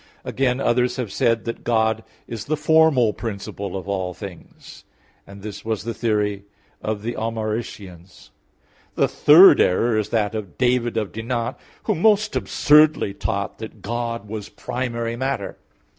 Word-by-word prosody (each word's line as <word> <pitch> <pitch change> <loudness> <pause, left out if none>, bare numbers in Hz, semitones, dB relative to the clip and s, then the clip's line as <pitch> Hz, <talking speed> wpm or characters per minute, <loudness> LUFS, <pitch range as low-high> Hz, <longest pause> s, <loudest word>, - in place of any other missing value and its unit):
Again, 130 -1 0
others 125 -1 +1
have 125 -6 -4
said 115 +3 +1
that 115 - -5
God 110 -1 +1 0.2
is 115 -3 -6
the 155 +1 -1
formal 150 -7 +4
principle 100 -3 -5
of 95 - -8
all 95 -3 -2
things; 95 -3 -11 0.4
and 100 0 -12
this 105 -1 -7
was 110 -2 -2
the 115 +1 -3
theory 105 -3 -1 0.4
of 105 -1 -3
the 120 +2 -2
Almaricians. 110 -5 -5 0.6
The - - +3
third 170 +6 +7
error 115 +5 +2
is 105 - -3
that 105 -3 0
of 105 -5 -6
David 125 -2 +1
of 105 -3 -2
Dinant, 115 +1 -3 0.3
who 215 - +1
most 210 +3 +2
absurdly 150 -8 +3
taught 100 0 -3
that 110 -2 -9
God 115 0 -3
was 105 -1 -6
primary 120 -2 -4
matter. 130 -4 -3
115 Hz, 145 wpm, -22 LUFS, 105-125 Hz, 0.6 s, third